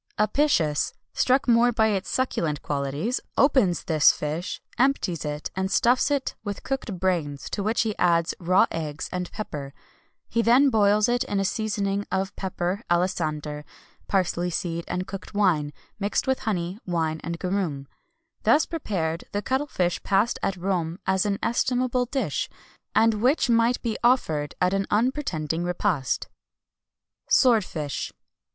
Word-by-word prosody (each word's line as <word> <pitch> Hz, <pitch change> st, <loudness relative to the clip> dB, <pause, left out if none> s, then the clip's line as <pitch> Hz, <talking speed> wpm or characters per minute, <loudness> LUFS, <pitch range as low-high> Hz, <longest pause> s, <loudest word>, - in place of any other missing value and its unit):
Apicius, 210 Hz, -, +2 dB, 0.2 s
struck 260 Hz, +1 st, +2 dB
more 240 Hz, 0 st, +5 dB
by 220 Hz, -1 st, +2 dB
its 195 Hz, -2 st, -1 dB
succulent 165 Hz, -, -1 dB
qualities, 145 Hz, -, -1 dB, 0.2 s
opens 255 Hz, -, +3 dB
this 155 Hz, -3 st, +5 dB
fish, 155 Hz, +5 st, -4 dB, 0.2 s
empties 245 Hz, -, +1 dB
it, 150 Hz, 0 st, -4 dB
and 190 Hz, 0 st, -1 dB
stuffs 245 Hz, +7 st, +3 dB
it 280 Hz, -2 st, 0 dB
with 205 Hz, -2 st, -5 dB
cooked 260 Hz, -8 st, -3 dB
brains, 165 Hz, -7 st, -1 dB
to 205 Hz, -, -2 dB
which 215 Hz, +3 st, +1 dB
he 220 Hz, -2 st, -1 dB
adds 170 Hz, -1 st, +3 dB
raw 185 Hz, +2 st, +4 dB
eggs 155 Hz, -2 st, -4 dB
and 180 Hz, -1 st, -4 dB
pepper; 145 Hz, -10 st, -6 dB, 0.5 s
he 230 Hz, -, +1 dB
then 255 Hz, +4 st, +5 dB
boils 210 Hz, -1 st, +4 dB
it 245 Hz, +1 st, +1 dB
in 205 Hz, -6 st, -1 dB
a 195 Hz, -, 0 dB
seasoning 205 Hz, -1 st, -1 dB
of 190 Hz, +1 st, -1 dB
pepper, 185 Hz, +1 st, -2 dB
alisander, 155 Hz, -4 st, -1 dB, 0.4 s
parsley 180 Hz, -2 st, 0 dB
seed, 170 Hz, -1 st, -2 dB
and 180 Hz, +1 st, -2 dB
cooked 195 Hz, +1 st, -8 dB
wine, 170 Hz, -8 st, +2 dB, 0.3 s
mixed 200 Hz, 0 st, 0 dB
with 265 Hz, 0 st, +1 dB
honey, 185 Hz, -2 st, -2 dB
wine, 160 Hz, -3 st, -1 dB
and 170 Hz, 0 st, -4 dB
garum.[XXI 195 Hz, +3 st, 0 dB
177] 140 Hz, -5 st, -5 dB, 0.5 s
Thus 310 Hz, -, +4 dB
prepared, 175 Hz, -, -3 dB
the 205 Hz, 0 st, -1 dB
cuttle 265 Hz, +5 st, 0 dB
fish 180 Hz, -9 st, -1 dB
passed 200 Hz, +5 st, +1 dB
at 195 Hz, -, -1 dB
Rome 175 Hz, -2 st, -1 dB
as 190 Hz, +1 st, +2 dB
an 200 Hz, -1 st, 0 dB
estimable 250 Hz, +1 st, +1 dB
dish, 270 Hz, +2 st, -2 dB, 0.5 s
and 220 Hz, -1 st, +3 dB
which 260 Hz, +1 st, +3 dB
might 230 Hz, +1 st, +3 dB
be 230 Hz, -3 st, -2 dB
offered 160 Hz, -, +2 dB
at 180 Hz, +1 st, +2 dB
an 195 Hz, 0 st, 0 dB
unpretending 205 Hz, -, 0 dB
repast. 175 Hz, -5 st, -1 dB, 1.0 s
SWORDFISH. 185 Hz, -, +2 dB
195 Hz, 145 wpm, -25 LUFS, 170-230 Hz, 1.0 s, more